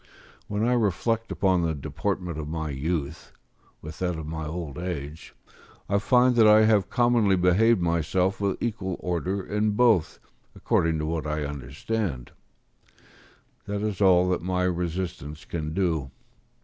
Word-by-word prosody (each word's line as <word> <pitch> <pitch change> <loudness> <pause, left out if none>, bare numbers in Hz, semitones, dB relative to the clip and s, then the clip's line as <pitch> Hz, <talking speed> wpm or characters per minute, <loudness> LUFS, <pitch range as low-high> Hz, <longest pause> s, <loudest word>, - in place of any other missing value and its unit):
When 105 +1 -2
I 125 - +3
reflect 115 +1 0
upon 95 -2 +2
the 80 -2 -1
deportment 80 +4 -3
of 75 - -5
my 80 -1 -3
youth, 75 +1 -4 0.5
with 75 0 -9
that 90 -2 -1
of 80 - -6
my 80 0 -5
old 80 -3 -5
age, 80 -3 -6 0.5
I 100 +1 +1
find 125 +4 +3
that 110 -2 +7
I 110 +1 +7
have 105 -4 +3
commonly 120 -5 +3
behaved 90 +3 +3
myself 85 +4 0
with 100 -1 0
equal 95 -6 -3
order 90 +3 -2
in 105 0 0
both 110 -7 +3 0.4
according 80 -1 +1
to 75 - -2
what 80 -1 -3
I 75 -1 -2
understand: 70 - -4 1.4
this 100 0 -3
is 105 -2 -3
all 90 -2 +5
that 90 - 0
my 90 +1 -1
resistance 85 -4 -3
can 80 -2 -4
do. 80 -6 -1
90 Hz, 150 wpm, -26 LUFS, 80-100 Hz, 1.4 s, that